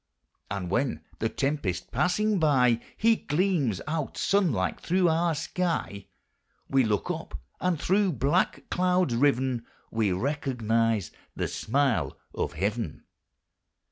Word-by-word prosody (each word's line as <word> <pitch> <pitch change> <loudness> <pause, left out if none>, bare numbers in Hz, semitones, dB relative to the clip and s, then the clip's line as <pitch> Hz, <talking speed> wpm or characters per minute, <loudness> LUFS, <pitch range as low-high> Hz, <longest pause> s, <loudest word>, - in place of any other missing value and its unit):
And 95 -3 -4
when, 120 - 0 0.2
the 110 - 0
tempest 135 -11 -2
passing 185 - +1
by, 125 -7 +4 0.2
He 225 0 +4
gleams 150 - 0
out, 155 -2 -3
sunlike 170 - +1
through 180 +1 +2
our 165 0 +2
sky, 165 - -2 0.6
We 135 -1 +3
look 105 -3 0
up, - - -6 0.2
and 180 -4 0
through 195 +1 +2
black 140 +8 +1
clouds 180 -6 +2
riven 130 -2 +2 0.3
We 110 -3 +1
recognize 115 - 0 0.2
the - - -1
smile 135 0 0 0.2
of - - -2
Heaven. 100 0 -2
135 Hz, 115 wpm, -27 LUFS, 110-175 Hz, 0.6 s, by